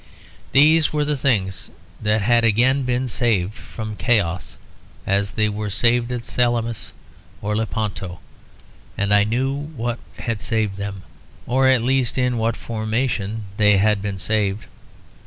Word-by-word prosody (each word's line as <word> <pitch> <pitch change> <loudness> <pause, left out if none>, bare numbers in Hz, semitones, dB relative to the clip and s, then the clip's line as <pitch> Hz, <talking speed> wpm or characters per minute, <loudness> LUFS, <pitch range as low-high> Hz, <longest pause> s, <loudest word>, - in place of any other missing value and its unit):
These 155 +3 +5
were 150 -1 0
the 150 0 0
things 105 -9 0 0.3
that 105 0 +1
had 120 +2 +3
again 120 +5 +3
been 125 0 0
saved 110 -5 0
from 110 -1 -7
chaos, 100 -7 0 0.5
as 100 +1 0
they 110 -1 +2
were 105 0 -3
saved 120 +4 +2
at 120 -1 -4
Salamis 120 -2 0 0.5
and 105 +1 -1
Lepanto; 105 -4 -3 0.8
and 100 0 +1
I 105 0 +6
knew 125 +6 0
what 140 -5 -4 0.2
had 115 -3 -3
saved 110 -4 -1
them 100 -2 -5 0.4
or 130 +2 +3
at 130 -3 +4
least 130 -1 +1
in 125 -2 +1
what 115 +1 0
formation 110 -1 -2
they 105 -1 +5
had 105 0 +2
been 100 -1 -3
saved. 100 +2 -1
110 Hz, 140 wpm, -21 LUFS, 105-125 Hz, 0.8 s, I